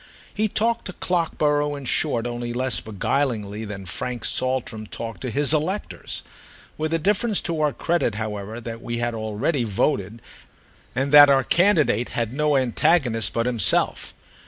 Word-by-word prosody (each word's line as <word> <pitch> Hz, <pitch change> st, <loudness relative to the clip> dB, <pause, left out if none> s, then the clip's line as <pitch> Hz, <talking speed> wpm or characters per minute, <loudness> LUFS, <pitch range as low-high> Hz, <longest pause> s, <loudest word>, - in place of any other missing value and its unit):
He 215 Hz, +1 st, +1 dB
talked 230 Hz, +3 st, 0 dB
to 185 Hz, -, -6 dB
Clockborough 150 Hz, -5 st, 0 dB
in 140 Hz, -1 st, -8 dB
short 115 Hz, -1 st, +1 dB
only 120 Hz, 0 st, -4 dB
less 130 Hz, +1 st, 0 dB
beguilingly 110 Hz, -1 st, -2 dB
than 100 Hz, -2 st, -7 dB
Frank 120 Hz, +6 st, -4 dB
Saltram 125 Hz, -4 st, -1 dB
talked 115 Hz, +1 st, -7 dB
to 130 Hz, -, -3 dB
his 145 Hz, +5 st, +3 dB
electors; 175 Hz, +7 st, -3 dB, 0.5 s
with 155 Hz, 0 st, -2 dB
the 165 Hz, -, +1 dB
difference 205 Hz, +5 st, +1 dB
to 165 Hz, -3 st, -2 dB
our 150 Hz, -1 st, +2 dB
credit, 165 Hz, -8 st, 0 dB
however, 105 Hz, 0 st, -5 dB
that 115 Hz, -1 st, -7 dB
we 120 Hz, 0 st, -4 dB
had 120 Hz, 0 st, -1 dB
already 115 Hz, +6 st, -1 dB
voted 105 Hz, 0 st, -1 dB, 0.8 s
and 135 Hz, +2 st, -1 dB
that 145 Hz, -1 st, +10 dB
our 135 Hz, -1 st, +4 dB
candidate 155 Hz, -, +3 dB
had 115 Hz, -1 st, -1 dB
no 150 Hz, 0 st, +2 dB
antagonist 130 Hz, -, +1 dB
but 115 Hz, 0 st, 0 dB
himself. 120 Hz, -5 st, +1 dB
130 Hz, 155 wpm, -23 LUFS, 115-155 Hz, 0.8 s, that